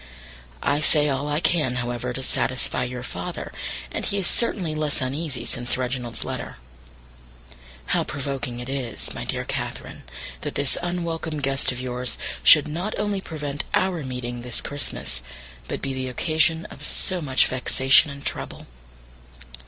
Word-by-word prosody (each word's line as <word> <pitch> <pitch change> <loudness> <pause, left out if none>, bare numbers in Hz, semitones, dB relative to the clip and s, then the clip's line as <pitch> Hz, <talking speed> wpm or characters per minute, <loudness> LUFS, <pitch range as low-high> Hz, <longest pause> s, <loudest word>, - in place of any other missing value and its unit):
I 145 +1 +3
say 150 -1 +5
all 140 +1 0
I 150 0 +2
can, 155 -7 +2
however, 120 0 -2
to 130 +2 -3
satisfy 130 -1 +1
your 125 0 -5
father, 90 -7 -5 0.4
and - - -2
he 200 - 0
is 195 - 0
certainly 185 -6 +2
less 155 -1 0
uneasy 135 +2 -2
since 120 0 0
Reginald's 125 -2 -2
letter. - - -4 1.4
How - - +3
provoking 135 -3 -3
it 120 - -6
is, 135 -4 -3
my - - -5
dear - - -2
Catherine, - - -4 0.4
that - - -4
this 140 -2 +2
unwelcome 170 -3 -2
guest 135 -1 +2
of 125 - -4
yours 125 0 -2 0.2
should 145 - +8
not 175 +8 -2
only 205 -2 0
prevent 145 -5 -3
our 185 -4 +1
meeting 125 -2 -4
this 120 -1 -2
Christmas, 140 - -2 0.5
but - - -4
be 135 -1 -1
the 130 0 -2
occasion 160 +4 +2
of - - -10
so 185 -2 -1
much 135 -4 +4
vexation 130 +3 +5
and 140 0 -8
trouble! - - -4
140 Hz, 150 wpm, -25 LUFS, 125-155 Hz, 1.4 s, should